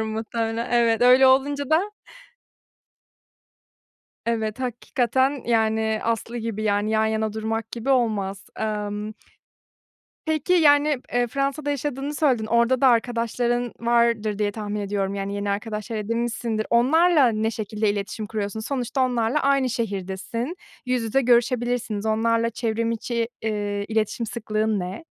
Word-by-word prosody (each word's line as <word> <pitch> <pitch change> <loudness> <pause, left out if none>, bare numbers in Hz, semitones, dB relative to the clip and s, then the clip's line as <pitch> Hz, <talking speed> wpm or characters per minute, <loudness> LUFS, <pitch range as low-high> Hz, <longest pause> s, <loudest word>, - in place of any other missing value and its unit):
muhtemelen. 225 +1 -3
Evet, 235 -1 +3
öyle 255 +2 +7
olunca 280 +2 +2
da 350 +7 +2 2.4
Evet, 220 0 -1
hakikaten, 260 +2 0
yani, 220 -1 +1
aslı 230 +1 -2
gibi, 220 -2 -4
yani, 205 0 +1
yan 220 0 +2
yana 220 -1 -1
durmak 225 +1 -3
gibi 235 +3 -4
olmaz. 210 -7 0
Emm 210 -1 -3 1.1
Peki, 315 +2 +1
yani, 295 -4 +4
eee, 245 0 +2
Fransa'da 275 +4 -2
yaşadığını 285 0 -3
söyledin, 260 -8 +2
orada 235 +3 +2
da 270 - +6
arkadaşların 240 0 +1
vardır 235 -3 +1
diye 205 -1 +1
tahmin 210 0 -4
ediyorum. 200 -1 -2
Yani, 200 0 -3
yeni 200 0 -2
arkadaşlar 215 +2 -3
edinmişsindir. 230 0 -2
Onlarla 295 +5 +4
ne 220 -1 0
şekilde 215 -1 -2
iletişim 205 +1 -4
kuruyorsun? 215 0 -3
Sonuçta 250 +2 -2
onlarla 245 +2 0
aynı 275 -2 +2
şehirdesin, 225 - -3 0.3
yüz 250 -1 0
yüze 225 +5 +1
görüşebilirsiniz. 240 -3 +1
Onlarla 230 +1 +1
çevrimiçi, 230 0 -2
eee, 205 -2 -2
iletişim 220 +1 -1
sıklığın 215 -2 -1
ne? 185 - -5
230 Hz, 125 wpm, -24 LUFS, 215-250 Hz, 2.4 s, öyle